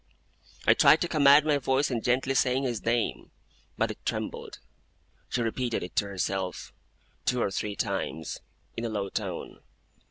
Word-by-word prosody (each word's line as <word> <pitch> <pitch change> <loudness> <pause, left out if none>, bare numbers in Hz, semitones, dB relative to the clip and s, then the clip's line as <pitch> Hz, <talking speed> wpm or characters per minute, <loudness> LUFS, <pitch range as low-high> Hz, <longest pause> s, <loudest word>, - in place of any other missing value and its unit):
I - - +7
tried 155 - +6
to 175 - +1
command 145 -2 +6
my 150 -2 +2
voice 135 +1 +1
in 120 -2 -1
gently 130 +3 +1
saying 130 0 +2
his 120 -5 -2
name, 115 0 -1 0.5
but - - +1
it - - -11
trembled. - - -4 0.7
She 120 - 0
repeated 120 +1 -1
it 90 - -8
to 100 - +2
herself, 95 -1 -3 0.5
two 125 - +1
or 100 - 0
three 105 +2 -3
times, 80 -4 -3 0.4
in 115 - -4
a 115 - -1
low 100 -3 -2
tone. 95 -4 -5
120 Hz, 160 wpm, -28 LUFS, 100-135 Hz, 0.7 s, I